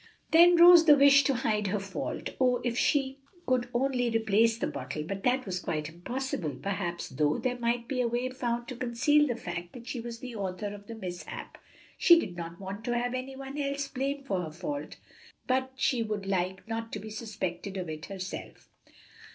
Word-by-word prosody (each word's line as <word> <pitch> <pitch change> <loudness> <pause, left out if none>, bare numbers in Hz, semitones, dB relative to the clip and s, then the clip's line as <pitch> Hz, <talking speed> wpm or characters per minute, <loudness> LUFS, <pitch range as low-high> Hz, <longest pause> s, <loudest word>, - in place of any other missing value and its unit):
Then 345 +1 +7
arose 345 -1 +9
the 300 -2 +8
wish 280 0 +7
to 275 - +2
hide 210 -4 0
her 205 +2 0
fault. 195 0 -4
Oh, 250 -1 +4
if 240 -1 -1
she 270 +1 +1 0.3
could 250 -1 +1
only 245 -1 +1
replace 225 0 +3
the - - -1
bottle! 150 - -4
but 195 +5 -5
that 255 +3 +1
was 185 -2 -2
quite 155 -3 -3
impossible. 175 - -4
Perhaps, 195 -3 -3
though, 145 +3 +1
there 250 -1 -2
might 235 0 0
be 255 -2 -1
a 240 - +2
way 240 +2 -1
found 240 -2 -2
to 255 - -5
conceal 260 +5 +3
the 240 - -1
fact 175 -6 -6
that 240 -2 -10
she 245 0 -4
was 235 0 -6
the 245 0 -8
author 200 0 -4
of 205 0 -11
the 230 - -7
mishap; 180 -5 -7 0.4
she 340 -1 +8
did 185 - -4
not 170 0 -7
want 195 +2 -6
to 240 -1 0
have 245 +1 -1
any 255 +1 -4
one 270 +2 -7
else 280 0 -1
blamed 275 +1 -3
for 190 -8 -1
her 160 -3 -5
fault, 285 - -5 0.5
but 260 0 0
she 260 -2 +1
would 210 -3 -3
like 190 0 -2
not 225 0 -4
to - - -2
be 215 +2 -8
suspected 200 -3 -4
of 180 -2 -4
it 155 -1 -6
herself. 190 -1 -7
235 Hz, 200 wpm, -29 LUFS, 195-260 Hz, 0.5 s, arose